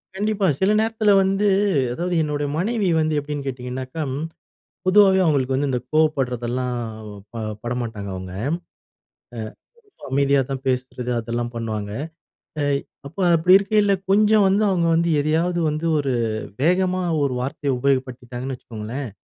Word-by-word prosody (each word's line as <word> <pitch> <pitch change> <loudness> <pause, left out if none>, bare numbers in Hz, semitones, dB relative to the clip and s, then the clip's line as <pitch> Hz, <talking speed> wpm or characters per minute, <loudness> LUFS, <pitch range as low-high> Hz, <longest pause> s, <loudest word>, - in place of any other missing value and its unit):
கண்டிப்பா. 210 0 0
சில 190 +2 +3
நேரத்துல 220 -1 +2
வந்து 195 +2 +1 0.5
அதாவது 175 +4 -2
என்னுடைய 145 -1 -1
மனைவி 210 +2 0
வந்து 155 -1 +1
எப்டீன்னு 145 -1 -5
கேட்டீங்கன்னாக்கா, 130 +3 -4 0.8
பொதுவாவே 190 0 +6
அவங்களுக்கு 135 -4 +1
வந்து 140 +2 +1
இந்த 125 -1 0
கோவப்பட்றதெல்லாம், 125 -5 0 0.6
ப - - -9 0.3
பட 120 +1 -3
மாட்டாங்க 105 -4 -6
அவங்க. 95 0 -7 0.2
அ, - - -1 1.4
ரொம்ப 405 - -28
அமைதியா 140 0 +3
தான் 135 -1 -3
பேசுறது 125 -1 -2
அதெல்லாம் 120 +1 -3
பண்ணுவாங்க. 110 -3 -4 0.7
எ - - +1 0.4
அப்ப 170 - -20 0.2
அப்படி 180 +3 +5
இருக்கைல 200 0 +2 0.2
கொஞ்ச 210 +2 +4 0.2
வந்து 200 +3 +2
அவங்க 170 -3 +1
வந்து 170 +1 +2
எதையாவது 165 +4 +1
வந்து 155 +2 -3
ஒரு 140 -2 0 0.5
வேகமா 185 +2 +2 0.2
ஒரு 140 -2 +1
வார்த்தைய 135 +2 -2
உபயோகப்படுத்திட்டாங்கன்னு 130 -1 -2
வச்சுக்கோங்களேன். 115 +4 -6
145 Hz, 130 wpm, -22 LUFS, 125-185 Hz, 1.4 s, பொதுவாவே